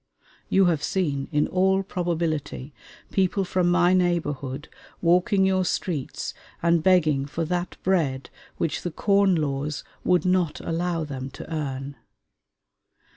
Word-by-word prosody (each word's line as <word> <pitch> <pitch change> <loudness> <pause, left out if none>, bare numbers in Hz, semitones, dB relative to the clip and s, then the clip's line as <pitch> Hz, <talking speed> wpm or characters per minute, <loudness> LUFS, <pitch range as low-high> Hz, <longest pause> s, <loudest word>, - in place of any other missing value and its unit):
You 195 0 +4
have 165 -5 +2
seen, 145 -6 -1
in 150 -1 +2
all 190 +1 +2
probability, 165 -6 -2 0.4
people 195 0 +1
from 180 -1 +1
my 175 0 +4
neighborhood 150 -6 0 0.3
walking 180 +3 +3
your 190 -1 +2
streets 170 -5 -3 0.3
and 170 -1 +3
begging 155 -6 +3
for 160 +3 -3
that 175 +1 -2
bread 150 -8 0 0.3
which 165 -3 -1
the 175 - -3
Corn 195 +2 +3
Laws 145 -1 -2 0.2
would 180 0 +2
not 180 -4 +1
allow 165 0 -1
them 135 -3 -5
to 160 - -9
earn. 140 -2 -4
170 Hz, 130 wpm, -25 LUFS, 150-185 Hz, 0.4 s, You